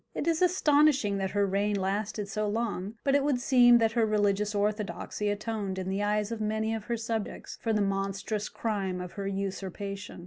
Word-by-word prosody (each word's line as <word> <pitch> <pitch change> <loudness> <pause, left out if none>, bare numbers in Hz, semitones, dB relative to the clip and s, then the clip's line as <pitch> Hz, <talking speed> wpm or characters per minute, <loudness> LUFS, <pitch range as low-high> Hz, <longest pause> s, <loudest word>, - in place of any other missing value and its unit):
It - - -2
is 330 0 +1
astonishing 295 - +3
that 190 0 -1
her 200 +1 +1
reign 200 +2 0
lasted 200 +2 -2
so 210 +2 -2
long, 210 -2 -2
but 275 - +2
it 285 0 +4
would 280 -3 +1
seem 245 -1 +6
that 225 -1 +2
her 230 0 +2
religious 210 -1 +1
orthodoxy 210 0 -1
atoned 205 -2 -3
in 185 0 -3
the 195 +1 -1
eyes 210 +1 0
of 225 -1 -4
many 220 +1 0
of 220 -2 -4
her 235 -1 -1
subjects 225 -1 -4
for 225 - 0
the 210 -2 +2
monstrous 195 +2 -2
crime 195 -5 -2
of 180 -1 -6
her 200 -1 -5
usurpation. 195 0 -4
210 Hz, 195 wpm, -29 LUFS, 200-225 Hz, -, seem